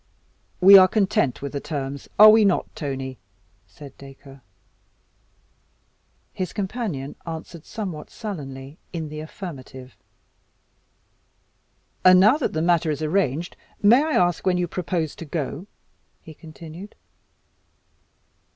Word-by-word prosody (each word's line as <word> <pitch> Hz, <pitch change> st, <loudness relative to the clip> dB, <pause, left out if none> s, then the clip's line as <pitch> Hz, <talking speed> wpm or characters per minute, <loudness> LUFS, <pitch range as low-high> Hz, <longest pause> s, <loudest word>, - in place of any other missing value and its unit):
"We 195 Hz, +1 st, +10 dB
are 185 Hz, -, +7 dB
content 200 Hz, -, 0 dB
with 140 Hz, -, -4 dB
the 140 Hz, -, -4 dB
terms 140 Hz, -2 st, -5 dB
are 215 Hz, +1 st, +10 dB
we 220 Hz, 0 st, +5 dB
not, 195 Hz, -3 st, 0 dB
Tony?" 135 Hz, -3 st, -5 dB, 0.5 s
said 140 Hz, +8 st, -13 dB
Dacre. 135 Hz, 0 st, -14 dB, 1.9 s
His 185 Hz, -2 st, -4 dB
companion 190 Hz, -, -4 dB
answered 165 Hz, 0 st, -8 dB
somewhat 185 Hz, -9 st, -6 dB
sullenly 145 Hz, -, -8 dB
in 160 Hz, -3 st, -5 dB
the 150 Hz, 0 st, -7 dB
affirmative. 135 Hz, -6 st, -9 dB, 2.1 s
"And 185 Hz, 0 st, +7 dB
now 215 Hz, +9 st, +5 dB
that 300 Hz, -, -2 dB
the 155 Hz, -, -1 dB
matter 170 Hz, -2 st, +2 dB
is 150 Hz, 0 st, -2 dB
arranged, 165 Hz, -1 st, -1 dB, 0.3 s
may 235 Hz, +6 st, +6 dB
I 315 Hz, 0 st, -2 dB
ask 175 Hz, -2 st, +1 dB
when 185 Hz, -1 st, +1 dB
you 175 Hz, -1 st, -1 dB
propose 170 Hz, -3 st, -3 dB
to 165 Hz, -, -8 dB
go?" 155 Hz, +3 st, -5 dB, 0.5 s
he 160 Hz, -, -13 dB
continued. 160 Hz, +5 st, -12 dB
165 Hz, 120 wpm, -23 LUFS, 140-190 Hz, 2.1 s, We